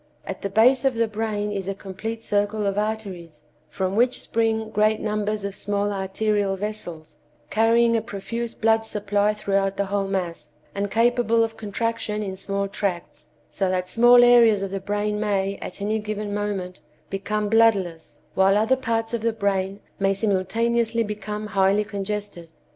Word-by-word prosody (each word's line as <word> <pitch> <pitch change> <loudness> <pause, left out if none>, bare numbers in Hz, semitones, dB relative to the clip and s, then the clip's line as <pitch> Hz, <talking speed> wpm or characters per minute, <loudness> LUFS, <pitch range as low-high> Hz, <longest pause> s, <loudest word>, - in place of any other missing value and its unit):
At - - -6
the 200 - -2
base 240 +6 +4
of 265 -3 +2
the 230 0 +1
brain 210 -1 -2
is 195 -2 -4
a 195 - -2
complete 220 +4 -6
circle 205 0 0
of 200 -1 0
arteries, 195 -8 -4 0.3
from 190 0 -2
which 245 +3 +2
spring 220 -1 -1
great 215 0 +2
numbers 210 -1 -2
of 200 - -3
small 205 +1 -1
arterial 195 +1 0
vessels, 190 -6 -7 0.3
carrying 230 +2 +4
a 225 - +2
profuse 230 +2 -5
blood 225 0 +2
supply 210 -1 0
throughout 195 -2 0
the 200 - 0
whole 200 0 -1
mass, 175 -6 -4 0.2
and 200 0 -2
capable 230 +1 +3
of 225 0 -3
contraction 215 0 -2
in 190 -2 -4
small 200 +1 -2
tracts, 180 -6 -4 0.2
so 190 -2 0
that 185 0 -1
small 240 +1 +6
areas 230 -4 +6
of 195 - -4
the 195 - -2
brain 205 +2 -2
may, 200 -2 0
at - - -6
any 215 +2 0
given 210 -1 -4
moment, 200 -3 -3 0.3
become 210 +2 -2
bloodless, 200 -7 +2 0.2
while 195 +1 +4
other 220 +5 +3
parts 230 -3 -2
of 235 - -1
the 230 +1 +1
brain 200 -2 -1 0.2
may 195 0 +2
simultaneously 225 +4 +1
become 210 0 -5
highly 200 0 +2
congested. 205 -4 -5
210 Hz, 165 wpm, -24 LUFS, 195-225 Hz, 0.3 s, small